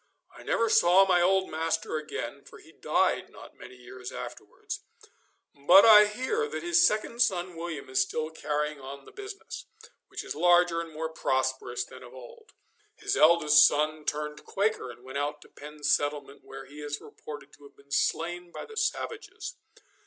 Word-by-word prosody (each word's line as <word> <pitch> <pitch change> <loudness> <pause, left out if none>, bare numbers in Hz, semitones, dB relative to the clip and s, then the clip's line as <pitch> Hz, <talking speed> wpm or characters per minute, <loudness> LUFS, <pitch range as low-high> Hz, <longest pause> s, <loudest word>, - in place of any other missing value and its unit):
I - - -12
never 230 - +1
saw 190 -2 +5
my 180 -2 +3
old 190 +1 +2
master 160 0 -1
again, 155 0 -6
for - - -14
he - - -17
died - - 0
not - - -14
many 125 - -12
years 125 0 -10
afterwards; - - -7 0.7
but 175 +9 +7
I 210 -2 +9
hear 260 - -2
that 445 - -6
his 345 0 +4
second 215 +2 +1
son 180 -6 +1
William 165 -2 -6
is 130 0 +1
still 155 +4 -2
carrying 150 -1 -3
on 135 +1 -9
the - - -14
business, 405 +1 -9 0.4
which - - -7
is - - -5
larger 175 +1 +3
and 165 -1 -8
more 160 +1 -4
prosperous 130 -4 -1
than 130 - -13
of 125 0 -13
old. 125 -2 -14 0.4
His - - -2
eldest 155 -2 +6
son 155 +1 -1
turned 150 0 -3
Quaker 205 -8 -1
and 120 +1 -12
went 130 +2 -5
out 145 +1 -2
to - - -19
Penn's 150 0 -4
settlement, 145 -1 -2
where 135 0 -10
he 145 +2 -12
is 145 0 -4
reported 145 -1 -11
to - - -18
have 140 - -18
been 140 0 -22
slain 175 +4 -1
by - - -7
the 440 - -12
savages. 465 +3 -3
155 Hz, 175 wpm, -28 LUFS, 140-180 Hz, 0.7 s, I